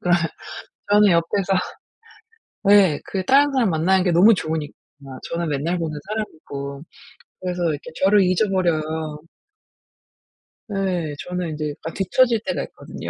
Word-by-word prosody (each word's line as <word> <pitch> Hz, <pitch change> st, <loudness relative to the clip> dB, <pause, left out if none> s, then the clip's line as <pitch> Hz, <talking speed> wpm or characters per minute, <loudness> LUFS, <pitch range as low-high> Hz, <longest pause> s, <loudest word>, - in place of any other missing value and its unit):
그러면 175 Hz, -1 st, +2 dB, 0.7 s
저는 210 Hz, 0 st, +6 dB
옆에서 180 Hz, +3 st, +1 dB, 1.2 s
예. 190 Hz, -7 st, +5 dB
그 190 Hz, -1 st, -3 dB
다른 285 Hz, +4 st, +4 dB
사람 255 Hz, -6 st, +2 dB
만나는 180 Hz, +3 st, +2 dB
게 180 Hz, -, +2 dB
너무 185 Hz, +7 st, +6 dB
좋으니까. 160 Hz, -5 st, -3 dB, 0.6 s
저는 170 Hz, -1 st, -2 dB
맨날 150 Hz, +5 st, -1 dB
보는 155 Hz, -3 st, -4 dB
사람이고. 145 Hz, -9 st, -6 dB, 0.6 s
그래서 180 Hz, -1 st, -3 dB
이렇게 145 Hz, -1 st, -6 dB
저를 200 Hz, +1 st, +5 dB
잊어버려요. 160 Hz, -5 st, 0 dB, 1.5 s
예. 185 Hz, -7 st, -2 dB
저는 180 Hz, -1 st, -3 dB
인제 155 Hz, -1 st, -3 dB
약간 160 Hz, +3 st, -8 dB
뒤쳐질 230 Hz, +5 st, +2 dB
때가 -, -, -2 dB
있거든요. -, -, -9 dB
180 Hz, 290 characters per minute, -22 LUFS, 155-195 Hz, 1.5 s, 저는